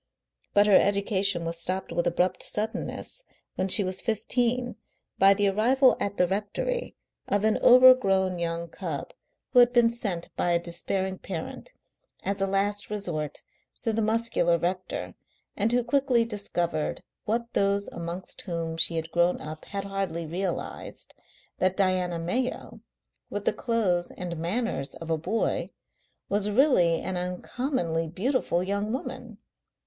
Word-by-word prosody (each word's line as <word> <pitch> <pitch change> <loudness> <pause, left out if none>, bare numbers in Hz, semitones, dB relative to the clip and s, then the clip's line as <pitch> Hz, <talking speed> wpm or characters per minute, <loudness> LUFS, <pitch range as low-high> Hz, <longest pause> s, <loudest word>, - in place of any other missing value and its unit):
But 205 0 +6
her 205 -2 +7
education 200 -3 +1
was 165 0 -4
stopped 185 +3 -2
with 175 - 0
abrupt 180 +2 +1
suddenness 225 - -4 0.3
when 190 - -1
she 200 +2 +5
was 185 0 -2
fifteen 245 +2 0 0.4
by 195 +1 +7
the 205 0 +2
arrival 250 +6 +4
at 200 0 -2
the 180 - +4
rectory 210 - -2 0.3
of 205 0 +1
an 220 - +2
overgrown 200 -8 +6
young 170 0 -2
cub - - -5 0.4
who 250 - +7
had 245 0 +7
been 235 -2 +5
sent 200 -8 -3
by 175 - +1
a - - +5
despairing 185 +2 -3
parent, 185 - -6 0.5
as 195 0 -2
a 195 - +2
last 200 +1 -1
resource, 175 -8 -4 0.4
to 225 - 0
the 225 - 0
muscular 220 -6 +2
rector, 180 +3 -3 0.4
and 215 +3 +1
who 245 0 +2
quickly 250 -1 +2
discovered 175 -7 -2 0.2
what 235 +2 -2
those 200 0 +1
amongst 170 +2 -5
whom 165 -3 -4
she 165 - +4
had 165 0 -3
grown 175 +1 +2
up 155 0 -8
had 200 -1 -4
hardly 195 -4 -3
realised, 175 +3 -4 0.5
that 185 0 +1
Diana 185 -3 +1
Mayo, 240 +10 -2 0.5
with 205 0 -4
the - - +3
clothes 205 -7 0
and 175 -1 -5
manners 175 - -2
of 165 0 -6
a 160 - +2
boy, 195 +8 -1 0.6
was 205 +1 0
really 205 - +4
an 185 -1 -3
uncommonly 180 - -2
beautiful 190 - 0
young 200 +3 -1
woman. 245 -3 -5
195 Hz, 145 wpm, -27 LUFS, 175-225 Hz, 0.6 s, her